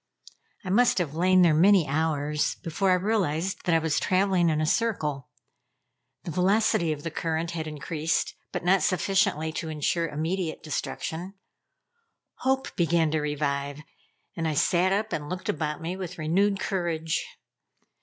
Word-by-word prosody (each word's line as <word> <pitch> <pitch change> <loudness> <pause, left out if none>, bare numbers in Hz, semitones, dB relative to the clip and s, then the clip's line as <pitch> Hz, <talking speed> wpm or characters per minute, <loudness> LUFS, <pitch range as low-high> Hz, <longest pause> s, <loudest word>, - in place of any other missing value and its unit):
I 185 - -2
must 240 +5 +4
have 165 -6 -1
lain 185 +3 +4
there 170 -3 +5
many 180 +1 +5
hours 150 0 0
before 190 +3 0
I 185 - +5
realized 185 -3 -1
that 175 - +3
I - - +6
was 160 -2 0
traveling 185 -2 +2
in 155 -1 +1
a 155 - +1
circle. 155 - -1 0.9
The 170 - -5
velocity 190 0 +2
of 150 -1 -5
the 165 - -4
current 165 +1 -2
had 160 -2 -4
increased, 155 +1 -2 0.2
but - - -4
not 190 +1 +4
sufficiently 185 -4 +1
to 160 0 -4
insure 160 +2 0
immediately 160 +3 -3
destruction. 165 +4 -4 1.0
Hope 265 0 -1
began 165 -2 +2
to 155 -1 0
revive, 145 -1 -2 0.5
and 165 -1 -2
I 155 - -1
sat 180 +5 +2
up 210 +1 -1
and 150 -2 -3
looked 180 -1 -5
about 150 +1 -2
me 175 +3 -3
with 185 -3 -6
renewed 195 +6 +1
courage. 165 -4 -1
165 Hz, 155 wpm, -26 LUFS, 155-185 Hz, 1.0 s, I